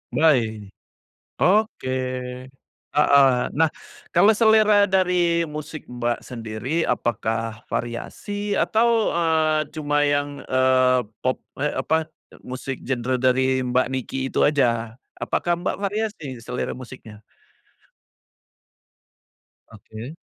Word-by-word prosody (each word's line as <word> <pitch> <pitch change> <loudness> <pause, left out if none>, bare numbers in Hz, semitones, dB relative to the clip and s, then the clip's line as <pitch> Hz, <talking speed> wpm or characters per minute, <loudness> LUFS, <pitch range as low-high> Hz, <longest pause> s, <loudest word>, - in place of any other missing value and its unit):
Baik, 115 -10 +2 0.7
oke, 210 -7 +2 1.0
heeh. 140 -2 +5 0.3
Nah, 160 0 +4 0.4
kalau 185 +5 +6
selera 215 -2 +5
dari 180 -3 +2
musik 150 +1 -8
Mbak 120 -1 -1
sendiri 120 +6 -3
apakah 115 -2 -2
variasi 205 - -4
atau, 225 +2 +2
eee, 160 -2 +2
cuma 145 -1 +1
yang, 145 -1 -1
eee, 130 -1 +3 0.3
pop, 130 - 0 0.2
eee, 145 +2 -1
apa, 160 0 0 0.2
eee, - - -17
musik 130 +1 -5
genre 130 0 -1
dari 130 +1 +2
Mbak 125 +1 +1
Niki 130 0 -3
itu - - +2
aja? 120 -6 +1 0.2
Apakah 175 0 -1
Mbak 175 +3 -3
variasi 205 - -4
selera 125 +2 -4
musiknya? 120 -4 -11 2.5
Oke. 110 +6 -10
135 Hz, 100 wpm, -23 LUFS, 125-170 Hz, 2.5 s, kalau